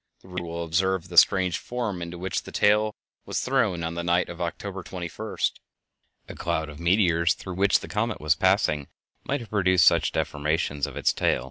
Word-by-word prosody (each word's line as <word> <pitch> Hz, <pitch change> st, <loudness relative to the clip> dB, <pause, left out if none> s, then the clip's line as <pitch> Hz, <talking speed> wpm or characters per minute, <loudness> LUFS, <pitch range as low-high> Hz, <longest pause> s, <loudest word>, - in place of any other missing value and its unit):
The -, -, -16 dB
reader 90 Hz, -1 st, -5 dB
will 85 Hz, 0 st, -4 dB
observe 90 Hz, +2 st, 0 dB
the 90 Hz, -, -8 dB
strange 90 Hz, 0 st, +5 dB
form 115 Hz, -7 st, -4 dB
into 85 Hz, +1 st, -6 dB
which 90 Hz, 0 st, -2 dB
the -, -, -11 dB
tail 105 Hz, +1 st, +3 dB, 0.3 s
was -, -, -1 dB
thrown 85 Hz, -2 st, +1 dB
on 80 Hz, 0 st, -2 dB
the 85 Hz, 0 st, -4 dB
night 85 Hz, +1 st, +1 dB
of 85 Hz, 0 st, -8 dB
October 95 Hz, +3 st, -4 dB
21st. 90 Hz, -1 st, -3 dB, 0.8 s
A -, -, -8 dB
cloud 80 Hz, -2 st, -2 dB
of 75 Hz, 0 st, -10 dB
meteors 85 Hz, -2 st, +3 dB
through 95 Hz, -, -7 dB
which 100 Hz, +3 st, +3 dB
the -, -, -8 dB
comet 105 Hz, +2 st, -2 dB
was 75 Hz, 0 st, +3 dB
passing 90 Hz, -5 st, +1 dB, 0.4 s
might 140 Hz, -1 st, -2 dB
have 115 Hz, -, -11 dB
produced 95 Hz, -4 st, +4 dB
such -, -, +4 dB
deformations 75 Hz, -1 st, -1 dB
of 70 Hz, -, -9 dB
its -, -, +2 dB
tail. -, -, +1 dB
90 Hz, 195 wpm, -26 LUFS, 85-95 Hz, 0.8 s, strange